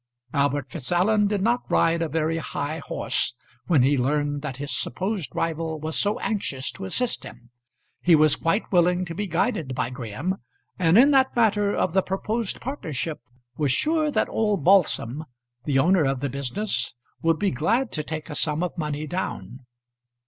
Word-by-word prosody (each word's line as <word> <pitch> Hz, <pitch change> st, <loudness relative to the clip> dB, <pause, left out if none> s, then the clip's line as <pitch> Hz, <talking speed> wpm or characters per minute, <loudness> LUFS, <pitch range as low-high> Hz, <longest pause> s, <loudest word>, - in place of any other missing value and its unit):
Albert 140 Hz, -1 st, 0 dB
Fitzallen 180 Hz, +8 st, +2 dB
did 200 Hz, -2 st, -1 dB
not 240 Hz, +3 st, +2 dB
ride 165 Hz, 0 st, +3 dB
a 165 Hz, -, -1 dB
very 160 Hz, +1 st, 0 dB
high 155 Hz, 0 st, -4 dB
horse 125 Hz, -, -1 dB, 0.3 s
when 150 Hz, -8 st, +4 dB
he 140 Hz, +1 st, +3 dB
learned 145 Hz, +2 st, 0 dB
that 140 Hz, -3 st, -4 dB
his 145 Hz, +1 st, -3 dB
supposed 185 Hz, -, -2 dB
rival 160 Hz, -1 st, -2 dB
was 155 Hz, +1 st, -3 dB
so 205 Hz, +1 st, +2 dB
anxious 140 Hz, -, -2 dB
to 195 Hz, -, -8 dB
assist 240 Hz, +6 st, -1 dB
him. 120 Hz, +1 st, -12 dB, 0.5 s
He 175 Hz, -2 st, +6 dB
was 155 Hz, -1 st, +5 dB
quite 180 Hz, +7 st, -1 dB
willing 180 Hz, 0 st, +3 dB
to 165 Hz, -, -6 dB
be 205 Hz, +4 st, -3 dB
guided 160 Hz, -5 st, -1 dB
by 120 Hz, -, -1 dB
Graham, 130 Hz, -, -3 dB, 0.4 s
and, 170 Hz, +1 st, +4 dB
in 275 Hz, +5 st, +7 dB
that 265 Hz, -1 st, +3 dB
matter 210 Hz, -3 st, +2 dB
of 175 Hz, -, 0 dB
the 190 Hz, -, +4 dB
proposed 210 Hz, +4 st, -2 dB
partnership, 165 Hz, -, -4 dB, 0.4 s
was 145 Hz, -4 st, +1 dB
sure 310 Hz, -, +2 dB
that -, -, +1 dB
old 210 Hz, -7 st, 0 dB
Balsam, 155 Hz, -7 st, +3 dB, 0.4 s
the 140 Hz, -3 st, +1 dB
owner 165 Hz, +3 st, +4 dB
of 135 Hz, -1 st, 0 dB
the 140 Hz, +1 st, -2 dB
business, 140 Hz, -, -3 dB, 0.3 s
would 165 Hz, -1 st, +2 dB
be 200 Hz, +1 st, +1 dB
glad 225 Hz, -, 0 dB
to 155 Hz, -, -1 dB
take 155 Hz, 0 st, -5 dB
a 150 Hz, -, -6 dB
sum 150 Hz, +2 st, 0 dB
of 180 Hz, -, -3 dB
money 150 Hz, -1 st, -2 dB
down. 130 Hz, -, -4 dB
165 Hz, 175 wpm, -25 LUFS, 145-200 Hz, 0.5 s, in